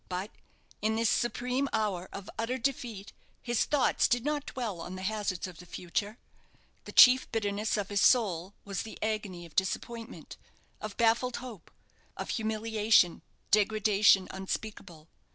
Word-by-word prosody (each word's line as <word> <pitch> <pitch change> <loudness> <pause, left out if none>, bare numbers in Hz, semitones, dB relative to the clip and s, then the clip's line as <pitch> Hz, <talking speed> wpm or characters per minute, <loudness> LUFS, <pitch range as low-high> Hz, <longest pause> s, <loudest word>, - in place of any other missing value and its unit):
But 185 +3 -4 0.5
in 220 +1 +1
this 230 0 +2
supreme 250 +3 0
hour 200 -5 -1
of 200 0 -8
utter 235 +3 -1
defeat, 235 -6 -3 0.3
his 240 -2 0
thoughts 290 -3 +2
did 245 +1 0
not 295 -1 -1
dwell 220 -9 -4
on 180 +2 -7
the 185 - -7
hazards 200 -3 -2
of 180 -4 -9
the 180 - -11
future. 200 +6 -3 0.7
The - - -8
chief 255 0 +7
bitterness 210 -1 -1
of 205 -1 -3
his 200 -1 +1
soul 195 -6 +3
was 195 -2 -3
the 220 - -8
agony 210 -5 -3
of 165 - -16
disappointment 230 +4 -3 0.4
of 215 -1 -6
baffled 235 +2 +2
hope 240 -8 -9 0.5
of - - -5
humiliation, 220 -4 +2 0.3
degradation 210 -2 +4
unspeakable. 190 -4 -6
215 Hz, 145 wpm, -30 LUFS, 190-230 Hz, 0.7 s, chief